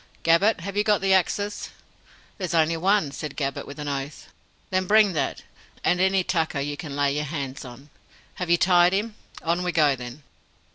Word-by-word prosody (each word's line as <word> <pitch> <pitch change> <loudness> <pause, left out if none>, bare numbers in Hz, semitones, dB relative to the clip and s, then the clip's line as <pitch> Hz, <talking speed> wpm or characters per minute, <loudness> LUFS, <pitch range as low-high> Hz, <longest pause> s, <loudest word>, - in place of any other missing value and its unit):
Gabbett, 170 +5 +3
have 200 +3 -6
you 205 - +2
got 210 -2 +3
the 195 0 +3
axes?" 205 +3 0 0.7
"There's 180 -3 -2
only 165 0 +3
one," 185 -2 +1
said 150 0 -7
Gabbett, 140 -2 -3
with 140 - -9
an 150 -1 -5
oath. 140 +1 -5 0.4
"Then 185 0 0
bring 210 -2 +5
that, 140 -4 -2 0.4
and 180 0 +2
any 190 0 +3
tucker 160 -5 -1
you 145 +1 -3
can 145 -2 -7
lay 140 -1 +1
your 150 +1 -2
hands 140 -3 -5
on. 135 +3 -12 0.5
Have 180 - -2
you 170 - +5
tied 175 0 +4
him? 210 +3 -1 0.3
On 170 +2 0
we 180 0 -1
go 150 -5 +3
then." 125 +3 -9
165 Hz, 190 wpm, -24 LUFS, 145-190 Hz, 0.7 s, bring